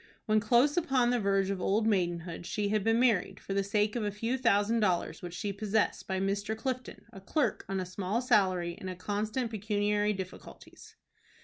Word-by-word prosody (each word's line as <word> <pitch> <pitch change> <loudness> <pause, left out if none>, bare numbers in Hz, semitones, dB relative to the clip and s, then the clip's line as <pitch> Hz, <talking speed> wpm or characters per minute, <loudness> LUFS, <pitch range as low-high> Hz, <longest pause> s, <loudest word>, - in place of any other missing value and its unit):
When 215 0 +3
close 245 +8 +3
upon 260 -7 +2
the 245 - +1
verge 195 -1 +1
of 190 -2 -3
old 215 +4 +1
maidenhood 175 -4 -1
she 205 -1 -1
had 210 -1 +1
been 225 +2 +3
married, 230 -7 +2
for 195 - -5
the 195 0 +1
sake 210 +2 0
of 235 - -1
a 205 - 0
few 225 +5 -2
thousand 230 -2 +2
dollars 180 -5 0
which 175 -1 -7
she 200 +3 -3
possessed, 210 +1 0
by 190 -1 -1
Mr. 200 +3 -1
Clifton, 255 +1 -4
a 195 - -10
clerk 295 +8 0
on 195 -1 -1
a 185 - -2
small 190 +4 -2
salary, 190 -8 +2
in 185 -1 -5
constant 215 +6 -2
pecuniary 210 0 0
difficulties. 190 -1 -10
205 Hz, 190 wpm, -30 LUFS, 195-225 Hz, -, When